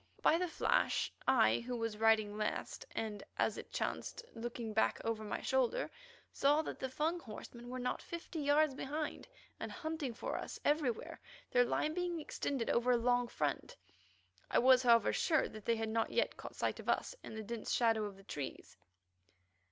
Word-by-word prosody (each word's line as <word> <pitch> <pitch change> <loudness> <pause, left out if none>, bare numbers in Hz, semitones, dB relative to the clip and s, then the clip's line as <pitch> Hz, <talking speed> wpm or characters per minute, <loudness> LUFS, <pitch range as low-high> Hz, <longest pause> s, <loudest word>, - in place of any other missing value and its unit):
By 325 - +5
the 360 - +1
flash 325 - +1
I, 260 -4 +5
who 245 +1 -4
was 225 -2 -2
riding 220 -2 +4
last 215 - -3
and, 210 -2 -3
as - - +2
it - - -10
chanced, 475 - -3
looking 230 -1 -5
back 220 - +2
over 225 -1 -1
my 210 - -3
shoulder, - - +1 0.4
saw 295 +3 +4
that - - -5
the 265 - -2
Fung 315 +6 0
horsemen 235 -1 -9
were 255 - -4
not 250 0 -2
fifty 340 -1 -6
yards 290 0 +4
behind, 295 +3 -4 0.3
and - - -4
hunting 315 -6 -3
for - - -3
us - - -6
everywhere, 290 -6 0 0.3
their 245 0 +5
line 305 +5 0
being 350 -1 -1
extended 275 -4 -2
over 240 +1 +2
a 245 - +6
long 245 +1 +2
front. 150 - -2 0.7
I - - +2
was, 255 0 +7
however, 235 -3 +5
sure 315 -5 +2
that 215 -1 -10
they 230 - +3
had 225 0 -2
not 225 0 +1
yet - - +1
caught - - -9
sight - - -1
of - - -6
us - - +1
in - - -8
the 220 - -4
dense 230 +1 -4
shadow 225 -3 +3
of 200 -2 -7
the 195 - -15
trees. 145 -7 -6
245 Hz, 185 wpm, -36 LUFS, 225-305 Hz, 0.7 s, was